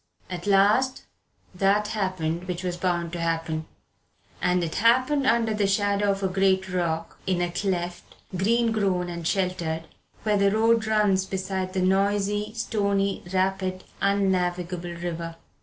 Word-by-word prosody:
At 175 +1 -5
last 210 +7 +3 0.5
that 200 +3 +2
happened 185 -4 -2
which 180 0 -4
was 180 -1 -2
bound 175 -1 -1
to 175 - -3
happen. 165 -1 -2 0.7
And 180 0 +2
it 160 - -3
happened 255 +6 +3
under 230 -1 +3
the 210 -2 +1
shadow 200 0 +1
of 195 0 0
a - - +3
great 190 0 +2
rock, 165 -2 -2
in 185 -2 +1
a 175 0 0
cleft, 175 -2 -3 0.2
green 230 +5 +2
grown 190 -5 0
and 170 -1 -4
sheltered, 175 -4 -1 0.4
where 210 -1 +2
the 200 0 +4
road 225 +1 +3
runs 205 -3 +2
beside 190 -1 -3
the 185 - 0
noisy, 205 +2 +1
stony, 200 -3 0
rapid, 185 0 0 0.2
unnavigable 180 -3 0
river. 170 -1 -5
190 Hz, 140 wpm, -25 LUFS, 175-205 Hz, 0.7 s, the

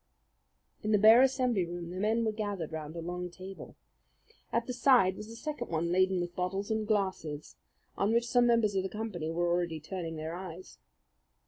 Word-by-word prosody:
In 215 - -1
the - - +6
bare 220 +4 +8
assembly 255 -6 +2
room 170 0 -6
the 185 - -5
men 220 +3 +1
were 220 - +1
gathered 205 -7 -4
round 155 0 -6
a 170 - -4
long 180 +1 -4
table. 185 +2 -10 0.8
At 235 0 0
the 250 - -4
side 240 -7 +4
was 210 - -8
a 230 - -9
second 240 +1 -5
one 170 +1 -1
laden 185 0 +3
with 175 0 -4
bottles 195 +4 -2
and 220 -1 -1
glasses, 185 - -2 0.4
on 200 +2 +2
which 235 +1 +2
some 245 0 +4
members 230 -3 +3
of 190 - +1
the 190 - -4
company 210 -7 -4
were 175 +1 0
already 170 -2 0
turning 165 +1 -5
their 160 +1 -5
eyes. 180 0 -9
190 Hz, 195 wpm, -31 LUFS, 175-220 Hz, 0.8 s, bare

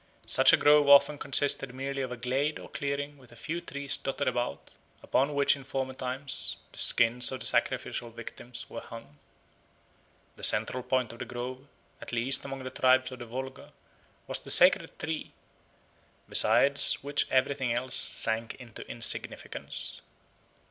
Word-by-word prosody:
Such - - +5
a - - +5
grove 145 -1 +4
often 140 +1 +6
consisted 135 -2 +2
merely 135 +1 -4
of 130 -2 -4
a 125 - -6
glade 135 +5 -1
or - - -12
clearing 145 0 -4
with 125 -2 -18
a - - -15
few 165 +8 -5
trees 140 -4 -2
dotted 140 +1 -4
about, 125 -1 -3 0.3
upon 140 +2 0
which 140 0 +3
in 140 - -11
former 130 0 -4
times 130 +1 -3 0.2
the - - -9
skins 120 +1 +3
of 130 - -5
the - - -4
sacrificial 120 - +1
victims 115 +1 -9
were 115 - -8
hung. 115 +5 -12 1.2
The - - -14
central 130 - +2
point 125 -2 -1
of 115 - -14
the - - -5
grove, 125 +2 -7 0.3
at - - -8
least 120 +3 +2
among 135 -1 -7
the 130 - -7
tribes 130 0 +2
of 130 - -9
the 120 - -9
Volga, 130 +3 -8 0.5
was - - -3
the - - -13
sacred - - +5
tree, 160 -1 -5 0.9
beside 125 +6 +3 0.2
which 145 +1 -1
everything 130 -1 0
else 125 +2 -2
sank 110 0 +2
into 120 -4 -12
insignificance. 115 -1 -4
130 Hz, 160 wpm, -28 LUFS, 125-140 Hz, 1.2 s, often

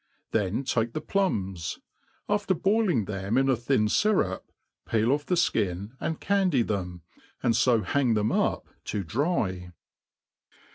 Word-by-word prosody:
Then 105 +4 0
take 115 -3 0
the - - -2
ploms, 95 - -1 0.5
after 205 -2 +1
boiling 190 - +2
them 100 +3 -2
in 135 0 +3
a 130 - +4
thin 120 -1 +1
fyrup, 105 - +2 0.5
peel 115 +2 +2
off 145 +1 0
the 180 - +2
flcin 100 - 0
and 160 - -3
candy 185 -10 +2
them, 90 -5 -4 0.4
and 115 -2 +3
fo 120 -2 +3
hang 130 -5 +1
theoi 105 +1 +1 0.2
up - - -12 0.2
to 100 - -2
dry. 95 - -1
115 Hz, 140 wpm, -27 LUFS, 100-160 Hz, 0.5 s, a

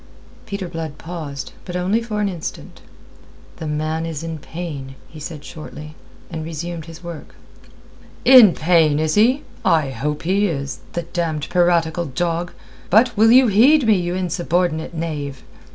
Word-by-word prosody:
Peter 200 -3 -4
Blood 165 -3 -6
paused, 155 -5 -6
but 180 - -7
only 190 +6 +1
for 215 -3 -3
an 205 - +1
instant. 175 -5 -7 0.8
"The 160 - -5
man 155 +2 -2
is 165 -2 -4
in 165 -1 -5
pain," 145 -5 -7
he 155 - -12
said 150 -1 -7
shortly, 155 0 -9 0.4
and 160 - -4
resumed 165 +1 -5
his 165 +1 -12
work. 170 -3 -9 0.9
"In 250 -8 +9
pain, 160 -3 +3
is 155 0 0
he? 245 +7 +3 0.2
I 155 -5 +2
hope 150 +4 -3
he 195 +4 +2
is, 140 -5 -4
the 170 - -2
damned 165 -3 -3
piratical 175 -1 +2
dog. 170 +4 -2 0.4
But 230 +4 +4
will 225 +2 +5
you 260 +2 +7
heed 245 +7 +5
me, 220 - +5
you 175 -1 -1
insubordinate 175 -2 -1
knave?" 145 -5 -4
170 Hz, 150 wpm, -20 LUFS, 155-185 Hz, 0.9 s, In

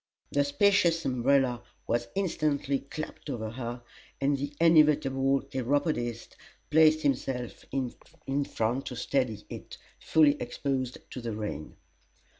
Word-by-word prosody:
The 145 - +3
spacious 165 +2 +3
umbrella 130 -1 +2 0.2
was 120 +1 0
instantly 150 -7 0
clapped 155 +2 -7
over 110 -5 -3
her, 120 0 -5 0.4
and 140 +1 +2
the 140 +1 -3
inevitable 145 -5 +4
Chiropodist 130 -3 -1 0.4
placed 155 0 +5
himself 130 -3 -1
in 135 +1 -3
front 120 +3 -1
to 125 - -5
steady 125 -4 -1
it, - - -9 0.2
fully 150 -2 +4
exposed 130 0 -2
to 130 - -6
the 115 -2 -4
rain. 105 -8 -5
135 Hz, 115 wpm, -29 LUFS, 120-145 Hz, 0.4 s, placed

